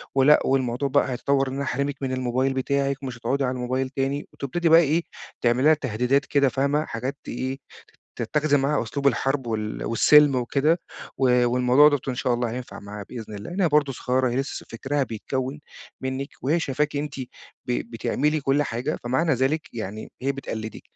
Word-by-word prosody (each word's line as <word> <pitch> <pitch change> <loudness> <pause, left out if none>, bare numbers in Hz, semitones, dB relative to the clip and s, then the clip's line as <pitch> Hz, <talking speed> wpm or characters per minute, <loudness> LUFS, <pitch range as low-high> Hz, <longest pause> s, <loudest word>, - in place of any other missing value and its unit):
ولأ 135 +3 +6
والموضوع 130 +1 0
بقى 130 - +2
هيتطوَّر 135 +2 +1
إن 130 - -4
أنا 140 +1 -2
أحرمِك 140 +2 -1
من 130 -1 -2
الموبايل 130 +1 0
بتاعِك 140 +1 -1
ومش 125 -2 -5
هتُقعُدي 135 +3 -1
على 125 - 0
الموبايل 130 +1 -2
تاني، 135 +1 -2
وتبتدي 165 +5 -1
بقى 165 +1 +8
إيه 165 +2 +1 0.4
تعملي 120 +2 +2
لها 155 - +7
تهديدات 130 0 0
كده، 140 -2 +3
فاهمة؟ 140 +3 0
حاجات 130 +5 -4
تإيه 130 +2 -4 0.6
تتَّخِذي 150 -1 +1
معاها 140 0 +1
أسلوب 140 +5 -3
الحرب 135 0 +1
وال 110 -1 -3
والسِلْم 145 +4 +5
وكده، 140 +7 +2 0.4
و 125 -2 +4
والموضوع 125 +4 +5
دوّة 145 -3 +1
إن 130 - -1
شاء 125 -1 0
الله 120 -1 -1
هينفع 125 +1 -7
معاها 100 0 -8
بإذن 110 -3 -8
الله، 100 +11 -7
لإن 190 +3 -3
هي 175 - +4
برضه 145 -2 +2
صغيّرة 130 +1 0
هي 120 - -2
لسّه 135 +1 -3
فكرها 135 +5 -1
بيتكوّن 130 +4 -4 0.4
منِّك، 130 +1 -3
وهي 155 +6 +2
شايفاكِ 145 0 -1
أنتِ 145 -1 -3 0.5
ب 120 -1 -2
بتعملي 150 +6 0
كلّ 140 +2 +2
حاجة، 120 -1 -3
فمعنى 145 +7 +1
ذلك 135 +4 -1
يعني 110 -1 -6
هي 140 +1 +1
بتقلّدِك، 110 -5 -6
135 Hz, 180 wpm, -24 LUFS, 125-145 Hz, 0.6 s, بقى